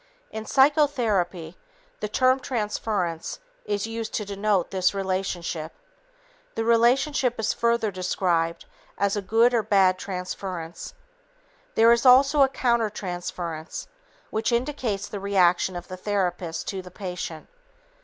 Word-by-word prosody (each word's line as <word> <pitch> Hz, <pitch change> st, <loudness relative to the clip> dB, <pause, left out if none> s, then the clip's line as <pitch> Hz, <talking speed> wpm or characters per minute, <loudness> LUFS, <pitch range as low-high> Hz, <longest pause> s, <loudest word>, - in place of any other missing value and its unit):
In 220 Hz, 0 st, -6 dB
psychotherapy, 235 Hz, -, +2 dB, 0.4 s
the 210 Hz, -, -2 dB
term 255 Hz, +4 st, +3 dB
"transference" 210 Hz, -8 st, -2 dB, 0.3 s
is 205 Hz, 0 st, -1 dB
used 225 Hz, -1 st, -5 dB
to 210 Hz, -, -2 dB
denote 200 Hz, -2 st, 0 dB
this 185 Hz, 0 st, +1 dB
relationship. 185 Hz, -4 st, -3 dB, 0.8 s
The 225 Hz, -, -1 dB
relationship 245 Hz, +2 st, +3 dB
is 220 Hz, -, +1 dB
further 235 Hz, -2 st, +1 dB
described 175 Hz, -2 st, -1 dB, 0.3 s
as 200 Hz, 0 st, +1 dB
a 205 Hz, -, -1 dB
good 225 Hz, +5 st, +3 dB
or 235 Hz, -, +3 dB
bad 195 Hz, -3 st, +3 dB
transference. 180 Hz, -2 st, -6 dB, 0.8 s
There 230 Hz, +1 st, +6 dB
is 235 Hz, 0 st, +3 dB
also 275 Hz, +3 st, +6 dB
a 270 Hz, -, +6 dB
countertransference 180 Hz, -9 st, -2 dB, 0.5 s
which 220 Hz, +2 st, 0 dB
indicates 235 Hz, -5 st, -1 dB
the 205 Hz, -, -6 dB
reaction 185 Hz, -2 st, +2 dB
of 175 Hz, -, -6 dB
the 185 Hz, -, -7 dB
therapist 180 Hz, -4 st, -2 dB
to 190 Hz, -1 st, -4 dB
the 180 Hz, -, -11 dB
patient. 180 Hz, -4 st, -6 dB
200 Hz, 125 wpm, -25 LUFS, 180-235 Hz, 0.8 s, There